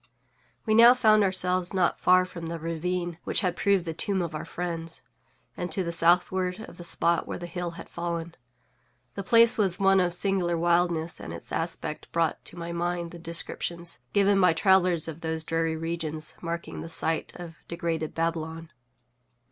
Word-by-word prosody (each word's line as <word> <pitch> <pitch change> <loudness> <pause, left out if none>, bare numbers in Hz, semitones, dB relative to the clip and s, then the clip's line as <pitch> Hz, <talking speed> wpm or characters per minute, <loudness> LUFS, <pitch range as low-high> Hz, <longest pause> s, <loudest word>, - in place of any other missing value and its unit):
We 215 - +2
now 235 +3 +8
found 215 -4 +4
ourselves 185 -1 +1
not 180 -2 +1
far 185 0 +5
from 170 -2 -8
the 170 0 -4
ravine 170 +1 -3
which - - 0
had 180 -4 0
proved 200 -3 +2
the 165 - -3
tomb 195 +4 -1
of 170 -1 -5
our 155 - -5
friends, 165 -2 -4 0.5
and 175 -1 -4
to 185 +4 +1
the 170 - -3
southward 180 +3 +2
of - - -11
the 175 - -9
spot 170 0 +1
where - - -4
the 175 - -7
hill 175 0 -4
had - - -9
fallen. 170 -1 -4 0.8
The 200 - -5
place 230 +3 +5
was 190 -4 +2
one 195 0 +4
of 180 -1 +1
singular 180 -3 0
wildness, 170 -1 +1
and - - -7
its - - -7
aspect 165 -2 -4
brought 165 -2 0
to 175 - -9
my 170 0 -5
mind 170 0 -2
the 175 - -10
descriptions 170 -2 -4
given 200 -1 +3
by 180 -2 +5
travellers 180 -2 +3
of 160 0 -7
those 160 -1 -2
dreary 165 0 -1
regions 160 -1 -3
marking 170 0 -5
the - - -7
site 160 0 +1
of 170 -2 -10
degraded 165 -2 -3
Babylon. 165 0 -3
170 Hz, 180 wpm, -27 LUFS, 165-185 Hz, 0.8 s, now